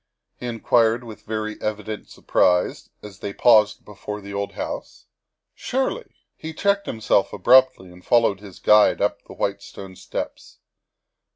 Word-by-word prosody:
he 125 Hz, -, -5 dB
inquired 115 Hz, 0 st, +2 dB
with 110 Hz, -3 st, -11 dB
very 110 Hz, -1 st, -5 dB
evident 105 Hz, 0 st, -4 dB
surprise 90 Hz, 0 st, +1 dB
as 100 Hz, -3 st, -11 dB
they 100 Hz, -, -5 dB
paused 105 Hz, -1 st, +4 dB
before 105 Hz, 0 st, -7 dB
the 100 Hz, 0 st, -9 dB
old 100 Hz, 0 st, -3 dB
house. -, -, -7 dB, 0.2 s
" -, -, -61 dB, 0.2 s
Surely 270 Hz, -, -3 dB, 0.2 s
He 160 Hz, 0 st, -8 dB
checked 200 Hz, +1 st, +1 dB
himself 105 Hz, -3 st, +1 dB
abruptly 130 Hz, -2 st, +4 dB
and 90 Hz, 0 st, -16 dB
followed 115 Hz, -5 st, +2 dB
his 100 Hz, -3 st, -12 dB
guide 105 Hz, 0 st, +4 dB
up 100 Hz, 0 st, 0 dB
the -, -, -11 dB
white 100 Hz, 0 st, -2 dB
stone 95 Hz, -1 st, -11 dB
steps. -, -, -7 dB
105 Hz, 150 wpm, -22 LUFS, 100-120 Hz, 0.2 s, paused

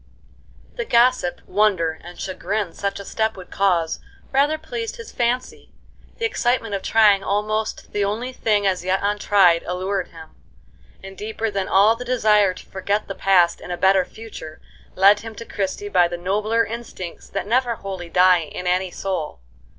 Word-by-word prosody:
The 480 Hz, -, -1 dB
gossip, 240 Hz, -, +2 dB
wonder, 185 Hz, -6 st, +1 dB
and 175 Hz, +1 st, -11 dB
chagrin 190 Hz, 0 st, -3 dB
such 200 Hz, 0 st, -3 dB
a 200 Hz, -, -8 dB
step 220 Hz, 0 st, -1 dB
would 185 Hz, -, -11 dB
cause 175 Hz, -5 st, +1 dB, 0.3 s
rather 285 Hz, +3 st, +2 dB
pleased 450 Hz, +10 st, -5 dB
his 465 Hz, -2 st, -10 dB
fancy; 250 Hz, -, -2 dB, 0.4 s
the 460 Hz, -, -1 dB
excitement 240 Hz, -, 0 dB
of 195 Hz, -, -2 dB
trying 210 Hz, -3 st, +4 dB
almost 215 Hz, +2 st, -2 dB
the 205 Hz, -, +1 dB
only 225 Hz, +6 st, -2 dB
thing 210 Hz, -4 st, +1 dB
as 185 Hz, -2 st, +1 dB
yet 185 Hz, +1 st, +1 dB
untried 200 Hz, -4 st, +3 dB
allured 185 Hz, +1 st, -2 dB
him; 160 Hz, -1 st, -13 dB, 0.7 s
and 195 Hz, 0 st, -9 dB
deeper 220 Hz, +2 st, -3 dB
than 195 Hz, -1 st, -2 dB
all 205 Hz, +4 st, +5 dB
the 245 Hz, -, -7 dB
desire 210 Hz, -6 st, +3 dB
to -, -, -12 dB
forget 200 Hz, +2 st, -2 dB
the 195 Hz, -, -4 dB
past 185 Hz, -3 st, +3 dB
in -, -, -10 dB
a 175 Hz, -, -3 dB
better 190 Hz, 0 st, +4 dB
future 180 Hz, -7 st, -10 dB, 0.4 s
led 200 Hz, +2 st, +6 dB
him 225 Hz, -1 st, -9 dB
to 230 Hz, -, -8 dB
Christie 200 Hz, 0 st, -3 dB
by 180 Hz, -3 st, +4 dB
the 175 Hz, 0 st, -5 dB
nobler 210 Hz, +6 st, 0 dB
instincts 225 Hz, -6 st, -8 dB
that -, -, -3 dB
never 240 Hz, +2 st, +1 dB
wholly 190 Hz, -4 st, -7 dB
die 180 Hz, -1 st, +4 dB
in 180 Hz, -, -7 dB
any 180 Hz, +1 st, +1 dB
soul. 175 Hz, -, -4 dB
200 Hz, 170 wpm, -22 LUFS, 185-225 Hz, 0.7 s, led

